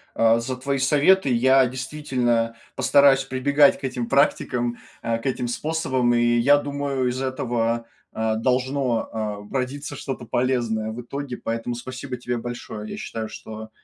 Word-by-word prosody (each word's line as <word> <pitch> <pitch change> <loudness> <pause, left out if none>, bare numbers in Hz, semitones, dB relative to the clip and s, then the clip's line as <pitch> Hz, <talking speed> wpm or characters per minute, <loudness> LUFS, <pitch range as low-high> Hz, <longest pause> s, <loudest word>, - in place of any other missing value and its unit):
а, 115 0 +4
за 125 +2 -3
твои 140 +2 -1
советы, 145 +5 +4
я 130 +2 +5
действительно 125 -3 -1 0.2
постараюсь 135 0 +5
прибегать 140 +2 +3
к - - -22
этим 125 -3 -2
практикам, 120 -3 +1 0.2
а, 115 0 0
к 115 - -12
этим 125 -2 -1
способам, 130 -2 0
и 120 0 +3
я 140 +5 +5
думаю 140 -3 -1
из 125 +2 -3
этого, 120 -3 -1 0.3
а, 110 0 0
должно, 130 0 0
а, 110 -2 -3 0.2
родиться 140 +2 -3
что-то 130 -2 -5
полезное 115 -2 0
в 115 +2 -6
итоге. 140 +1 -5
Поэтому 115 +1 -3
спасибо 130 +2 -6
тебе 120 0 -3
большое! 115 -3 -6
Я - - -6
считаю, 110 -1 -5
что 110 0 -9
125 Hz, 150 wpm, -23 LUFS, 115-135 Hz, 0.3 s, я